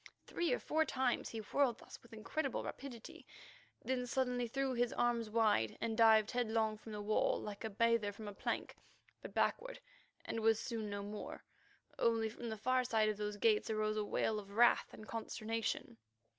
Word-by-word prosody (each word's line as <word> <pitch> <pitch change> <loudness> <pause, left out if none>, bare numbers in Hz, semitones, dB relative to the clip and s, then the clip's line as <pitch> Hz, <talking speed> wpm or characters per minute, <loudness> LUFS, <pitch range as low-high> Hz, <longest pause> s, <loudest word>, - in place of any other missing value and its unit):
Three 345 - -1
or - - +3
four 315 +1 +1
times 260 -5 0
he 230 - -6
whirled 245 +2 +1
thus - - -12
with 235 - -19
incredible 245 +6 -2
rapidity, 250 -5 -8 0.6
then 250 -1 -1
suddenly 250 -1 0
threw 270 +2 -1
his 245 -1 +1
arms 235 -2 +1
wide, 210 - +2
and 225 -1 -1
dived 220 -2 +6
headlong 225 -2 +1
from 220 - -10
the 210 -1 -5
wall 215 +1 +2
like 205 0 -6
a 220 - -2
bather 230 0 +2
from 210 +1 -9
a 205 - -5
plank, - - -3 0.5
but - - -9
backward, - - 0 0.5
and 225 - -3
was 225 0 +3
seen 225 -3 -3
no 200 0 -4
more. 205 +1 -7 0.6
Only 225 -1 +2
from 235 +1 -6
the 220 - -4
farther 255 +3 +1
side 215 -1 +3
of 210 - -2
those 210 0 -3
gates 215 0 +3
arose 215 -1 0
a 215 - 0
wail 215 +1 0
of 200 -1 -11
wrath 240 +3 +4
and 215 - -11
consternation. 225 - -3
225 Hz, 185 wpm, -36 LUFS, 215-240 Hz, 0.6 s, dived